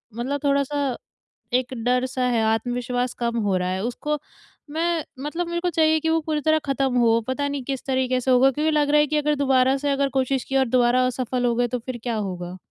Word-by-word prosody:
मतलब 270 +5 -3
थोड़ा-सा 280 -1 0 0.6
एक 255 +1 0
डर-सा 250 +1 0
है, 235 -2 +1
आत्मविश्वास 245 +2 -1
कम 235 -1 -2
हो 205 -3 +1
रहा 180 0 -1
है। 185 +1 -2
उसको 295 +6 -2 0.5
मैं 330 +1 -1 0.2
मतलब 335 +4 -3
मेरे 345 0 -2
को 360 - 0
चाहिए 315 -1 +3
कि 320 - -1
वो 325 0 +3
पूरी 305 -2 -1
तरह 315 +1 +3
ख़त्म 270 -2 0
हो 230 -1 +4
पता 285 +2 -1
नहीं 280 -2 -3
किस 270 0 -4
तरीके 260 -1 0
से 260 +1 +1
होगा 260 +2 +5
क्योंकि 305 +4 0
लग 295 -1 +2
रहा 295 +1 +5
है 295 - +3
कि 300 +1 0
अगर 300 0 +1
दोबारा 265 0 +3
से 285 +1 -1
अगर 275 0 +1
कोशिश 265 -1 0
की 270 - -5
और 265 - +3
दोबारा 250 +1 +3
असफल 255 0 -2
हो 240 - +2
गए 245 0 +1
तो 245 +1 -3
फिर 245 +1 -6
क्या 240 -2 -2
होगा? 185 -3 -4
260 Hz, 225 wpm, -23 LUFS, 245-290 Hz, 0.6 s, होगा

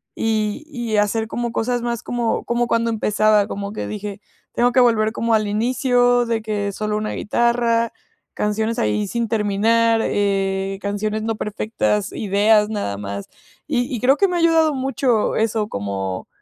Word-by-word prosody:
y 215 +4 -1
y 240 -7 -3
hacer 215 +2 +1
como 235 +1 -3
cosas 240 +1 -1
más 235 -1 -2
como 240 -2 -1
como 240 0 0
cuando 230 0 +1
empezaba, 215 -1 +2
como 200 0 -5
que - - -4
dije, 205 -1 -6 0.3
tengo 245 +1 +2
que 255 - +4
volver 220 -3 +3
como 230 -1 0
al 215 -1 +2
inicio 245 +2 +2
de 230 -1 -1
que 210 -2 -2
solo 210 0 -2
una 215 0 -3
guitarra, 235 0 +1 0.4
canciones 220 +2 -1
ahí 210 -3 0
sin 235 +3 -2
terminar, 225 +2 +2
eh, 195 -1 0
canciones 210 +2 -2
no 225 0 -1
perfectas, 210 -1 -1
ideas 210 +1 +2
nada 200 - -3
más, 100 0 -6 0.4
y 245 - +1
y 230 - -3
creo 270 +3 +4
que 395 - +4
me 360 - -2
ha - - +1
ayudado 325 -2 +4
mucho 260 -4 0
eso, 220 -1 0
como, 95 -2 -4
220 Hz, 165 wpm, -21 LUFS, 205-235 Hz, 0.4 s, que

